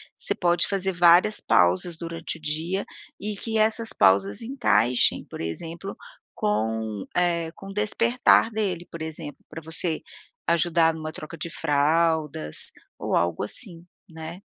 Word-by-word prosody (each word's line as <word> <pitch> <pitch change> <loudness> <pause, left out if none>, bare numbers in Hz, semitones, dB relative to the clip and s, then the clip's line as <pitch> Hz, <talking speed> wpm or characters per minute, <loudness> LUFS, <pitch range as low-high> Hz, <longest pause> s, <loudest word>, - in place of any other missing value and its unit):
você - - -2
pode 175 -1 +2
fazer 195 -1 0
várias 175 +5 +5
pausas 90 - +2
durante 165 -1 -6
o - - -19
dia 160 +6 -2 0.3
e 210 +1 -3
que 225 +2 -3
essas 220 +1 +1
pausas 100 +1 +3
encaixem, 225 - +2
por - - -9
exemplo, 165 - -5 0.4
com, 110 - -1
eh, 170 -2 +1
com 195 - -11
o - - -7
despertar 230 +3 +3
dele, 195 -6 -2
por 165 - -7
exemplo, 160 -1 -6
pra 160 +1 -8
você 160 +1 -4 0.5
ajudar 165 -1 +3
numa 155 0 -6
troca 160 +2 -8
de 165 +2 -5
fraldas, 150 - +1 0.4
ou - - -1
algo 85 -1 +1
assim, 175 - -7 0.2
né. 160 +3 -8
165 Hz, 140 wpm, -25 LUFS, 150-195 Hz, 0.5 s, várias